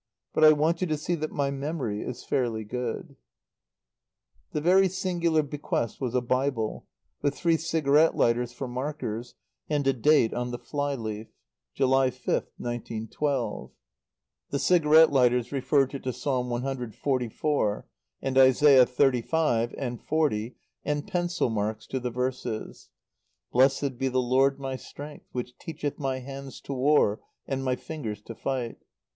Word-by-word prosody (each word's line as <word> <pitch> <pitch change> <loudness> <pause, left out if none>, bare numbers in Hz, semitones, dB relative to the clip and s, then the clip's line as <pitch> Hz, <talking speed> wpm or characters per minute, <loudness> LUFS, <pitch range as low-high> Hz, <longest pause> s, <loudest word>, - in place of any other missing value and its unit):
But - - +2
I 155 - +10
want 155 +3 +1
you 185 - +1
to 155 -1 0
see 160 +4 -2
that 155 -2 -2
my 140 -1 0
memory 135 -6 -3
is 125 0 -6
fairly 115 -4 -1
good." 120 +2 -5 1.3
The - - -1
very 185 +4 +4
singular 170 -4 +1
bequest 145 -5 -3
was 125 -2 -2
a 125 - +3
Bible, 125 -2 -1 0.3
with 145 0 0
three 170 -2 +2
cigarette 160 -1 +3
lighters 120 +1 +2
for 130 +2 -5
markers, 125 -3 -4 0.3
and 145 -2 0
a 135 - +4
date 130 -1 +3
on 125 0 -2
the 120 - -4
fly 145 +2 -2
leaf: 110 -2 -5 0.5
"July 135 0 +3
5th, - - -2
1912." 120 +3 -3 0.8
The 140 - -1
cigarette 160 -1 +5
lighters 125 -3 +3
referred 135 0 +2
her 140 - -5
to 130 -1 -3
Psalm 125 -2 -1
cxliv., 125 -1 -1 0.4
and 135 -1 -1
Isaiah 130 0 +7
xxxv. 125 -1 +1
and 120 -3 -4
xl., 130 -7 0 0.3
and 150 +2 -2
pencil 175 - 0
marks 110 0 -2
to 130 - -3
the 125 0 -3
verses: 125 -2 -4 0.6
"Blessed 135 0 +2
be 135 - +1
the 130 0 -1
Lord 135 +2 +2
my 135 -1 -4
strength 145 +3 -10
which 125 0 -5
teacheth 150 -4 -5
my 135 -2 -1
hands 135 +1 -8
to 140 - -5
war 130 -5 +3 0.3
and 135 -1 -2
my 130 -1 +1
fingers 110 -10 -6
to 115 - -8
fight."... 125 0 -3
135 Hz, 145 wpm, -27 LUFS, 120-150 Hz, 1.3 s, I